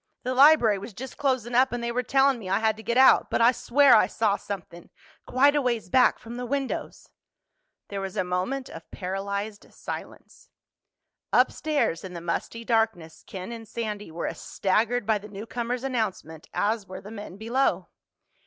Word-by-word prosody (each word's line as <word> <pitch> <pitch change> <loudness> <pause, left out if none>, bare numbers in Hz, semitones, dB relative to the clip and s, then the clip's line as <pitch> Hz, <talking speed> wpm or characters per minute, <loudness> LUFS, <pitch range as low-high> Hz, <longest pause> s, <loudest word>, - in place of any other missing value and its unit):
The 255 - -1
library 255 -7 +6
was 200 +1 -9
just 260 +1 -8
closin' 260 -4 -1
up 260 +2 +4
and 240 0 -3
they 235 - -1
were 250 +1 0
tellin' 270 +1 +2
me 190 -4 -7
I 195 - +2
had 220 0 +1
to - - -9
get 235 +2 -1
out. 265 0 +6
But - - 0
I 230 +1 +6
swear 270 +2 +4
I 215 - +5
saw 210 0 +1
somethin'—quite 205 - -2
a 290 - +3
ways 235 -7 -1
back 255 +6 +4
from 235 +1 -9
the 250 - -4
windows." 275 0 -4 0.8
There 200 -1 -4
was 195 +1 -6
a 190 - +2
moment 185 +10 -2
of 165 - -11
paralyzed 200 +2 -5
silence. - - -9 0.8
Upstairs, 295 - +1
in 185 -2 -8
the - - -4
musty 175 +7 -4
darkness, 225 -9 0
Ken 190 +3 -7
and 225 -1 -8
Sandy 210 -3 -5
were 165 +1 -5
as - - -5
staggered 225 +4 0
by 215 -1 +2
the 210 +1 -12
newcomer's 235 +4 -4
announcement 210 - -3
as 210 -1 -1
were 185 - -8
the 205 - -11
men 205 -3 -8
below. 235 +6 0
225 Hz, 180 wpm, -26 LUFS, 195-250 Hz, 0.8 s, library